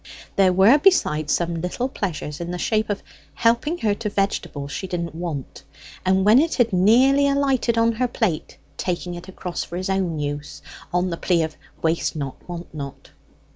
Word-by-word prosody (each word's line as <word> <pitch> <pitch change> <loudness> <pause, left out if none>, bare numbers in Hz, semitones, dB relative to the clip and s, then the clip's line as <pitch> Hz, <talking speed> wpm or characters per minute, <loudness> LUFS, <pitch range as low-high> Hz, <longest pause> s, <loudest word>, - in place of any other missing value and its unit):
There 190 -2 +5
were, 195 +10 +6
besides, 155 - +3
some 170 -1 0
little 180 +8 -2
pleasures 170 - -4
in 170 - -4
the 180 - -3
shape 215 +3 0
of 205 - -2 0.3
helping 235 +8 +2
her 210 - +4
to 210 +1 -3
vegetable 195 -8 -2
she 190 +6 -5
didn't 170 -3 -3
want, 160 -5 -5 0.4
and 190 +1 +2
when 215 +5 +7
it 325 +3 +1
had 235 -5 +2
nearly 255 +9 +5
alighted 270 -4 +1
on 230 0 +4
her 250 +3 0
plate 220 -9 -2 0.2
taking 175 0 -2
it 175 +1 -8
across 180 -2 -4
for 175 - -6
his 185 +1 -2
own 185 -4 0
use, 145 0 -5 0.3
on 180 +1 +1
the 170 - -3
plea 170 -2 +2
of 155 -1 -4 0.3
waste 165 +1 0
not, 140 +2 -6
want 175 -1 -7
not. 140 -3 -8
185 Hz, 180 wpm, -23 LUFS, 170-230 Hz, 0.4 s, when